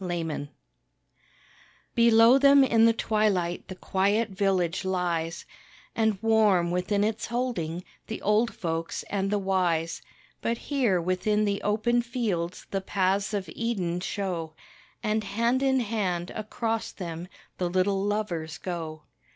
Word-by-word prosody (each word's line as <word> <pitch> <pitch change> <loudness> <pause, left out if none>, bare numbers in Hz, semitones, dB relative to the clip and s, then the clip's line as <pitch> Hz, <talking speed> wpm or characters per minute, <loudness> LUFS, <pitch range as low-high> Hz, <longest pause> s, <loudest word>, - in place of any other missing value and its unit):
_ - - -6
TWILIGHT 165 -5 -3 1.4
Below 235 +2 +6
them 280 0 +7
in 230 -3 +4
the 230 - +5
twilight 210 -6 0
the 185 - -7
quiet 200 +5 +1
village 190 -3 0
lies, 175 -3 -2 0.5
And 220 -2 +2
warm 210 -6 +3
within 190 +3 0
its 220 +2 -1
holding, 225 -9 -2 0.2
the 220 - -5
old 215 +3 +3
folks 165 -1 -3
and 195 -1 0
the 205 - +1
wise, 180 -4 0 0.4
But 230 0 -1
here 240 -10 +1
within 185 +5 +1
the 200 -1 -1
open 225 +3 +1
fields 210 -8 -3
the 195 - -1
paths 195 +1 0
of 195 -2 -3
Eden 190 -7 -2
show, 180 -5 -3 0.5
And, 215 0 0
hand 235 +6 0
in 265 -1 +3
hand, 195 -6 -2
across 225 +1 -3
them 170 -2 -6 0.3
the 180 -1 0
little 190 +2 +1
lovers 175 -7 -2
go. 160 -4 -5
200 Hz, 135 wpm, -27 LUFS, 175-225 Hz, 1.4 s, them